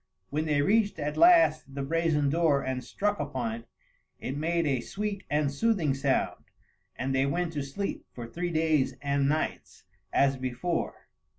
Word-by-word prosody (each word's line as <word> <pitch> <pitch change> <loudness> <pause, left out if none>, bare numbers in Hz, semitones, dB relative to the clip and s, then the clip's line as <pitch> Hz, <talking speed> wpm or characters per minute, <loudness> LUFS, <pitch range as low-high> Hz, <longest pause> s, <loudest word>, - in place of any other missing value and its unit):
When 155 +2 -1
they 145 -2 +2
reached 205 +3 +2
at 150 +1 -3
last 330 - +5
the 140 - -2
brazen 155 -1 +1
door 155 -4 +2
and 130 -1 -3
struck 205 0 -1
upon 130 -6 -2
it, 115 +1 -8 0.5
it 135 - -4
made 165 +3 0
a 135 -4 +1
sweet 205 - -4
and 145 -1 +1
soothing 175 -4 +1
sound, 135 0 0 0.5
and 135 +1 -2
they 135 +1 +2
went 170 +3 -1
to 145 - -2
sleep, 140 +9 -4
for 120 - -7
three 175 +9 -3
days 160 -4 +1
and 140 -1 +1
nights, 155 +1 -3 0.3
as 135 -1 +3
before. 130 +7 -3
150 Hz, 165 wpm, -28 LUFS, 135-170 Hz, 0.5 s, last